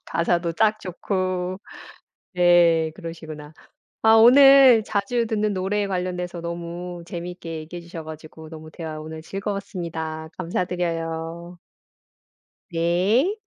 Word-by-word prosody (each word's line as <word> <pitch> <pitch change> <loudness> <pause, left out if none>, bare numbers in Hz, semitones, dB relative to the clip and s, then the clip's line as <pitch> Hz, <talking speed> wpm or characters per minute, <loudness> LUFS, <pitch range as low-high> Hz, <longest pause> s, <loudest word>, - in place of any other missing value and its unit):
가사도 170 0 0
딱 215 +4 +2
좋고. 185 0 -3 0.8
네. 175 -2 +4
그러시구나. 160 -4 -9 0.5
아 220 0 +6
오늘 260 0 +8
자주 225 +3 -1
듣는 215 -2 0
노래에 200 +2 -1
관련돼서 180 -2 -3
너무 170 +1 -6
재미있게 170 -1 -6
얘기해 165 +3 -8
주셔 170 -1 -9
가지고 155 0 -10
너무 155 -1 -10
대화 155 -2 -7
오늘 160 +1 -8
즐거웠습니다. 170 -5 -5
감사드려요. 170 -1 -3 1.1
네. 190 - +1
175 Hz, 255 characters per minute, -23 LUFS, 165-195 Hz, 1.1 s, 오늘